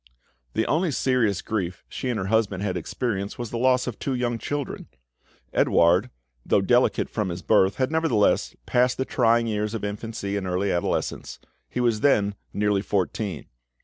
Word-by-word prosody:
The 110 - +1
only 170 +3 +1
serious 125 - +1
grief 95 -5 -3
she 130 - -4
and 120 - -1
her 95 - -2
husband 100 -2 +1
had 95 -3 -1
experienced 100 +3 -3
was 120 -2 -5
the 115 - -3
loss 130 0 +3
of 120 -4 -5
two 135 - -2
young 120 -2 -1
children. 145 +4 -4 0.7
Edouard, 90 +8 +3 0.3
though - - +3
delicate - - +2
from 105 -3 -2
his 85 +1 -5
birth, 100 -3 +3
had 130 +2 0
nevertheless 160 -10 +2
passed 125 0 +2
the 130 - -1
trying 115 -2 +3
years 105 0 -2
of 110 - -5
infancy 100 -1 -3
and 95 -2 -3
early 95 +2 0
adolescence; 65 -7 -2 0.3
he - - -4
was 120 -3 +2
them 105 -8 +3 0.2
nearly 105 -1 +1
fourteen. 100 -3 -2
110 Hz, 170 wpm, -25 LUFS, 100-125 Hz, 0.7 s, loss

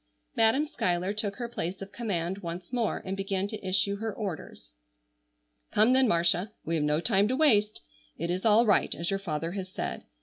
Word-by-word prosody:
Madam 225 +7 +4
Schuyler 180 - -1
took 210 -1 -2
her 240 +1 -4
place 185 -5 -4
of 195 0 -8
command 190 -5 -2
once 175 +4 -7
more 235 -3 -1
and 190 0 -2
began 195 0 -2
to 210 0 -7
issue 190 +2 +1
her 220 +1 -3
orders. 175 - -6 1.0
"Come, 220 +4 +5
then, 260 0 +5
Marcia, 175 +2 +2
we 165 - -2
have 160 -2 +1
no 150 +1 +2
time 200 +2 +2
to 255 - 0
waste. 215 -9 +3 0.4
It 170 - -2
is 185 +1 -2
all 225 +1 +5
right, 205 - +2
as 170 +2 -2
your 195 - 0
father 165 -3 -3
has 190 -1 -5
said. - - -5
195 Hz, 195 wpm, -28 LUFS, 175-220 Hz, 1.0 s, Come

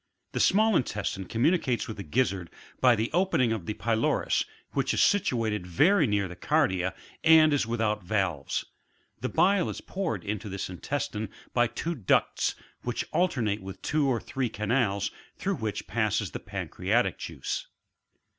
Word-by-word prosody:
32. - - +4
The - - +3
»mall 220 -1 +4
intestine 100 - -1
communicates 125 - +1
with 110 - -5
the - - -5
gizzard 100 -7 0 0.3
by 125 -2 +6
the 115 +1 -1
apening 170 -10 +2
of 100 -7 -5
the 105 - -2
pylorus, 115 -1 +1 0.3
which - - 0
is - - +4
situate 115 - +1
very 150 - +4
near 100 -2 +1
the 90 - -9
cardia, 95 - +1 0.3
and 160 -1 +7
is 140 -5 +1
without 110 -3 0
valves. 90 -8 -1 0.5
The - - -2
bile 195 -1 +3
is - - -5
poured 165 - -3
into 105 0 -4
this 95 -1 -4
intestine 110 +1 -3 0.2
by 120 -1 +4
two 165 +8 -3
ducts, 115 - +1 0.3
which 120 -1 -2
alternate 120 - +1
with 95 0 -8
two 150 -2 +1
or 125 -3 +1
three 130 0 -2
canals, 105 -2 0 0.3
through 195 -2 -1
which 110 -3 -3
passes 110 -2 0
the - - -5
pancreatic - - -1
juice. - - -4
115 Hz, 155 wpm, -28 LUFS, 100-150 Hz, 0.5 s, and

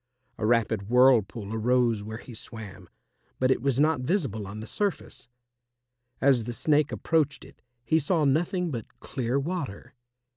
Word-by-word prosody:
A 110 - 0
rapid 110 -3 +1
whirlpool 115 -4 +3
arose 115 -1 +2
where 110 +2 -6
he 125 - -11
swam, 100 -5 -10 0.5
but 130 0 +2
it 130 - +1
was 135 -1 +1
not 150 -2 +3
visible 125 - -1
on 100 +2 -7
the 110 - -6
surface. 200 - -3 0.9
As 130 -5 +3
the 120 - -4
Snake 150 +3 +2
approached 155 -3 0
it, - - -17 0.2
he 160 +8 +3
saw 155 +1 +1
nothing 170 +5 +1
but 115 -5 -7
clear 130 0 -2
water. 140 - -5
125 Hz, 150 wpm, -27 LUFS, 110-145 Hz, 0.9 s, whirlpool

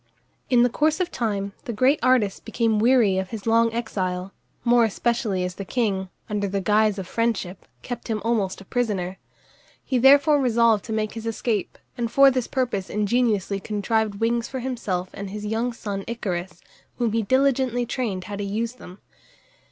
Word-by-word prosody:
In 245 -2 +5
the - - +5
course 310 +5 +1
of 360 -1 -1
time 200 -4 -2
the - - -3
great 260 +7 +3
artist 245 -6 +2
became 225 -3 0
weary 225 -5 +4
of 190 -1 -4
his 220 -3 -7
long 230 0 +3
exile, 190 -5 -3 0.3
more 240 0 +5
especially 220 -3 0
as 180 0 -3
the 195 - -6
king, 195 -4 -1 0.2
under 205 -1 -1
the 195 +1 -1
guise 210 +1 +2
of 190 - -4
friendship, 200 -3 -2 0.2
kept 245 - -6
him 220 -2 -1
almost 215 -5 0
a - - -13
prisoner. 195 -6 -2 0.7
He 255 - +1
therefore 285 +3 +6
resolved 230 -4 +3
to - - -7
make 215 -1 -1
his 230 0 -6
escape, 220 -2 -2 0.2
and 235 -1 0
for 275 +2 +7
this 255 -2 -1
purpose 240 -8 -2
ingeniously 210 -2 +1
contrived 215 +1 -1
wings 230 +2 0
for 260 - -5
himself 210 -8 -3
and 200 -1 -6
his 210 +1 -6
young 225 +3 -1
son 205 -4 -5
Icarus, 185 -6 -4 0.4
whom 235 -3 0
he 225 +1 +1
diligently 260 +1 +2
trained 225 -6 -3
how 205 +1 -6
to 205 - -3
use 220 +4 -2
them. 185 -7 -12
225 Hz, 175 wpm, -24 LUFS, 200-240 Hz, 0.7 s, for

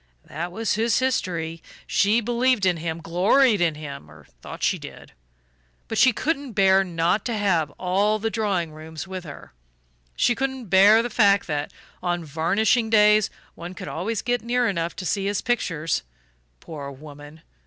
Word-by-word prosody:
"That 170 +4 -5
was 220 +3 -1
his 225 +2 +1
history. 170 -11 -1 0.2
She 210 +4 +2
believed 240 -1 +1
in 180 -2 +2
him, 165 0 -4
gloried 200 +7 +3
in 165 -3 +2
him 140 - -9
or 75 -1 -16 0.2
thought - - -9
she - - +1
did. - - -11 0.8
But - - -2
she 260 - +6
couldn't 280 0 -3
bear 195 -1 +4
not 175 +2 0
to 235 -3 -2
have 175 -7 +1
all 200 +4 +1
the 225 +1 -2
drawing 195 -8 -1
rooms 155 +3 -9
with 185 -1 -7
her. 145 - -11 0.6
She 240 - +2
couldn't 265 -3 -4
bear 205 +4 +6
the 240 - -4
fact 200 -3 +4
that, 150 -2 -3 0.3
on 175 -2 -2
varnishing 205 - +1
days, 210 -1 +5 0.2
one 175 +2 -9
could - - -8
always 200 +6 -3
get 245 0 0
near 240 +1 0
enough 170 -4 -2
to 185 - -6
see 195 +2 -1
his 205 -1 -1
pictures. 165 - -1 0.6
Poor 145 -4 -8
woman! 145 +2 -12
190 Hz, 165 wpm, -23 LUFS, 165-225 Hz, 0.8 s, she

